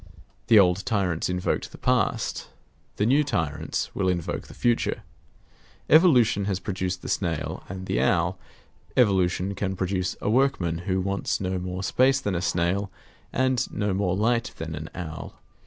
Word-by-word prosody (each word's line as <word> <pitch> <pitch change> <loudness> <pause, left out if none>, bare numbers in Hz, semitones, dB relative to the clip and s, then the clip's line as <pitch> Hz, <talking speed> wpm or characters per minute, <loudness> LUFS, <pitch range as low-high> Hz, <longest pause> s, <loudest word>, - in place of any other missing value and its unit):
The 115 - +7
old 90 -1 +4
tyrants 95 -9 0
invoked 90 0 -1
the - - -11
past; - - 0 0.5
the 105 - +1
new 140 +6 +4
tyrants 80 - -2
will 95 -1 0
invoke 85 -3 -2
the - - -13
future 120 -1 0 0.9
evolution 125 - +5
has 95 -2 -1
produced 95 -2 -3
the - - -6
snail 85 -5 -2
and 95 0 -6
the 60 - 0
owl; 65 - +1 0.6
evolution 95 -4 +2
can 95 -1 -2
produce 95 0 -1
a - - -4
workman 105 -9 +1
who 95 0 +2
wants 100 +1 -1
no 95 -1 -2
more 90 +1 -4
space 130 +7 +3
than 105 -8 -2
a 85 - -1
snail, 90 +3 0 0.4
and 130 -1 +1
no 105 -2 -1
more 95 -2 0
light 115 +2 +1
than 80 0 -5
an 75 +1 -6
owl. 80 -3 -7
95 Hz, 155 wpm, -25 LUFS, 90-110 Hz, 0.9 s, The